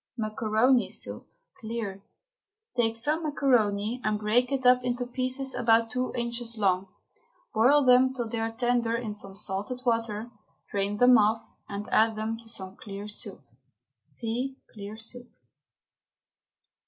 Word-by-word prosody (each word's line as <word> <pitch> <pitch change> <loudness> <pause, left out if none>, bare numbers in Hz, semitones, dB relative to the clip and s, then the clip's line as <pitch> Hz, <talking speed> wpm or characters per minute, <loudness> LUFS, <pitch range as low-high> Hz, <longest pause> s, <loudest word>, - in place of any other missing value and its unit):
MACARONI 220 +3 +2
SOUP - - -4 0.3
(CLEAR). 220 -4 -4 0.7
Take 225 -2 +2
some 300 +7 +2
macaroni 245 -7 +1
and 215 0 +1
break 225 +5 +2
it 265 -2 -1
up 250 0 +6
into 245 0 -1
pieces 255 +2 -1
about 230 -1 +3
two 250 +1 -1
inches 235 -1 -2
long. 190 -2 +1 0.7
Boil 265 +7 +5
them 255 +1 +6
till 245 -3 -3
they 225 0 -3
are 225 0 -1
tender 235 0 +1
in 230 -3 -4
some 195 -2 -9
salted 205 +5 -3
water, 230 -1 -1 0.4
drain 200 +1 -1
them 245 +1 +7
off 215 +2 +1 0.2
and 200 +1 -5
add 220 0 +4
them 220 +1 -3
to 230 -1 -14
some 190 -3 -7
clear 200 0 -7
soup. 210 - -6 0.6
(See 250 +4 -3 0.2
CLEAR 205 0 -8
SOUP.) 245 +2 -4
230 Hz, 140 wpm, -28 LUFS, 215-250 Hz, 0.7 s, them